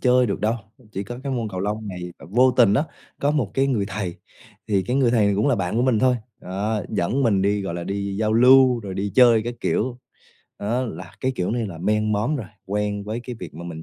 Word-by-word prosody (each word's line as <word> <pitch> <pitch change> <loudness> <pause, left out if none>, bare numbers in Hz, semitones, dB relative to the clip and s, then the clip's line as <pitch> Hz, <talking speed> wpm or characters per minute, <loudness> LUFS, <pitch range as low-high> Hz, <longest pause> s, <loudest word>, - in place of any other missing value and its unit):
chơi 125 0 +4
được 100 - -2
đâu, 110 +2 +1 0.4
chỉ 95 - -3
có 120 +5 -7
cái 135 -1 -3
môn 115 -4 -2
cầu 95 -2 -5
lông 105 +1 -3
này 90 -1 -6
và - - -12
vô 125 +4 +5
tình 115 -5 +4
á, 145 - +2 0.4
có 145 - +2
một 135 -10 0
cái 135 0 +2
người 120 -7 +1
thầy, 95 -3 -3 0.5
thì 100 -2 +2
cái 125 +6 -1
người 130 -4 +3
thầy 105 -4 +3
cũng 105 +7 +2
là 140 - +4
bạn 90 +2 -2
của 120 - +2
mình 125 -4 +3
thôi, 125 +2 +3 0.2
ờ, 100 +3 -2
dẫn 120 +11 0
mình 100 -6 +3
đi, 100 0 +1
gọi 90 -3 -4
là, 85 0 -4
đi 100 +1 -3
giao 110 +1 +1
lưu, 125 +1 +6
rồi 100 -3 -6
đi 100 +1 -2
chơi 120 -3 +6
các 120 +2 -4
kiểu. 125 +1 -1 0.6
Đó, 115 +5 -1
là 90 -7 -7
cái 130 +1 0
kiểu 90 -3 -1
này 115 -1 -1
là 85 -5 -8
men 105 +4 +1
món 110 +9 0
rồi, 110 -8 -5 0.2
quen 105 0 -2
với 110 +3 -4
cái 125 -1 -7
việc - - -8
mà 85 +2 -8
mình 80 -2 -7
110 Hz, 250 wpm, -23 LUFS, 100-125 Hz, 0.6 s, lưu